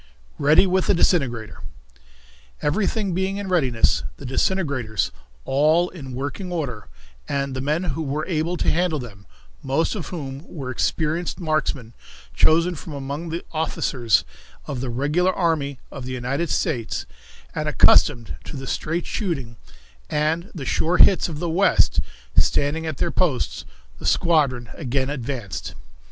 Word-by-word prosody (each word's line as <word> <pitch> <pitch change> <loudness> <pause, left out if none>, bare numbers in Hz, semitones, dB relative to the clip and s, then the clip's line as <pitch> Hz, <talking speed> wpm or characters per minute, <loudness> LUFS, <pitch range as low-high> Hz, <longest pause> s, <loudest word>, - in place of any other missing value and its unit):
Ready 150 +6 +6
with 185 0 +1
the - - +4
Disintegrator. 130 - +1 1.0
Everything 195 +4 0
being 190 +2 -1
in 200 -1 -4
readiness, 130 - +2 0.2
the - - -9
disintegrators 130 - 0 0.3
all 155 +6 +3
in 135 -8 -8
working 145 +8 -4
order, 130 - -3 0.4
and 140 -1 -1
the 130 - -2
men 150 +6 0
who 160 -3 -2
were 150 +1 -2
able 170 +1 -1
to - - +1
handle 175 -1 +1
them, 105 -7 -9 0.3
most 140 +5 +1
of 190 -8 -4
whom 140 -5 -6
were 135 -6 -5
experienced 160 +7 -1
marksmen, 155 -8 -1 0.4
chosen 165 - +4
from 160 0 -8
among 140 +4 -4
the 165 +2 -4
officers 130 -7 +1 0.4
of 130 -3 -4
the 130 - -2
regular 150 +9 +2
army 155 -6 0
of 135 -2 -7
the 130 - -4
United 135 +7 -1
States, 115 -5 -1 0.5
and - - -1
accustomed 120 -2 +5
to 145 - -7
the 135 - -6
straight 165 +5 -2
shooting 140 - -3 0.5
and 160 +5 0
the 145 -5 -5
sure 170 +6 +1
hits 190 -2 +6
of 155 - -5
the 175 - -2
West, 180 +4 +3 0.4
standing 160 +3 +2
at 155 -4 -3
their - - 0
posts, 165 -9 0 0.3
the 80 - -4
squadron 135 - +2
again 135 -1 -1
advanced. 120 - -4
150 Hz, 145 wpm, -23 LUFS, 130-170 Hz, 1.0 s, Ready